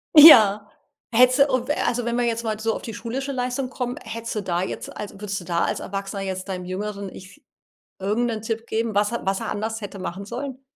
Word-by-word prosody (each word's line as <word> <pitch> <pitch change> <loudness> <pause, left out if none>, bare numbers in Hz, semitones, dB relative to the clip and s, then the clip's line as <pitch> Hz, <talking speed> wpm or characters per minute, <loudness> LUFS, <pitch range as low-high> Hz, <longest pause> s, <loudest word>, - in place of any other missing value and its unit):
Ja. 215 -9 +9 0.5
Hättest 250 +3 +5
du, - - +9
o 250 -1 0
w - - 0
also, 245 -1 0
wenn 235 0 -1
wir 245 - +2
jetzt 230 0 -1
mal 215 -1 -1
so 225 0 0
auf - - -5
die 225 - -7
schulische 265 +6 -4
Leistung 250 +1 -2
kommen, 250 -1 -4
hättest 230 +1 -5
du 210 - -1
da 175 -2 -1
jetzt - - -6
also, 205 -1 -7
würdest 200 0 -4
du - - -10
da 170 0 +1
als - - -2
Erwachsener 195 0 -4
jetzt 185 0 -4
deinem 185 -2 -4
jüngeren 200 +1 -4
Ich 200 +11 -13 0.6
irgendeinen 215 +3 -1
Tipp 225 +1 -3
geben, 225 -1 -1
was 205 +1 +2
er 235 - -3
was 195 0 0
er - - -4
anders 220 +2 -3
hätte 200 -1 -7
machen 185 +2 -5
sollen? 260 +3 -6
220 Hz, 230 wpm, -23 LUFS, 200-245 Hz, 0.6 s, Ja